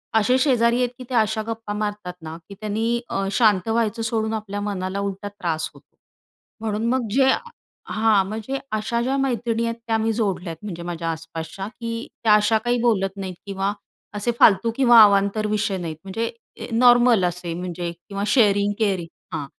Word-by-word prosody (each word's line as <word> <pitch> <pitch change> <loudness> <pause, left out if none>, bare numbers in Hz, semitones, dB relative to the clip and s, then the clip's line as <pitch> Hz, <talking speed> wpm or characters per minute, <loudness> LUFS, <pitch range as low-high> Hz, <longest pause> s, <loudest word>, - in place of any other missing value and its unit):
असे 220 +4 +4
शेजारी 240 -4 +3
आहेत 250 -1 +1
की 255 - -8
त्या 245 -3 +3
अशा 220 0 +1
गप्पा 225 -2 -4
मारतात 210 -3 -3
ना, 160 0 -7
की 200 - -9
त्यांनी 225 +2 -1
अ, 195 0 -1
शांत 210 -4 +3
व्हायचं 225 0 0
सोडून 225 -1 -1
आपल्या 205 -2 -4
मनाला 195 -1 -3
उलटा 200 0 -4
त्रास 170 -6 -3
होतो. - - -21 0.7
म्हणून 220 0 -2
मग 255 -2 0
जे 265 +3 +4 0.6
हां, 215 -3 +3
म्हणजे 220 +6 -4
अशा 220 +2 -1
ज्या 260 +3 0
मैत्रिणी 235 -3 0
आहेत, 230 0 -2
त्या 225 -1 +2
मी 220 0 0
जोडल्या 195 -5 -1
आहेत 165 - -8
म्हणजे 175 -4 -6
माझ्या 170 -1 -3
आसपासच्या 165 +4 -6
की 230 0 -6 0.2
त्या 220 -2 +5
अशा 210 +1 +3
काही 240 0 +2
बोलत 195 -4 +1
नाहीत 190 -2 -5
किंवा 195 0 -2 0.4
असे 210 +4 0
फालतू 230 +3 +5
किंवा 240 -3 +7
अवांतर 200 +1 +3
विषय 210 -2 0
नाहीत. 165 -3 -5
म्हणजे 225 +4 -3 0.4
नॉर्मल 240 -3 +5
असे 175 -1 -3
म्हणजे 175 0 -4
किंवा 195 +4 -7
शेअरिंग-केअरिंग 205 -5 +2 0.3
हां, 150 -3 -3
210 Hz, 170 wpm, -23 LUFS, 195-230 Hz, 0.7 s, किंवा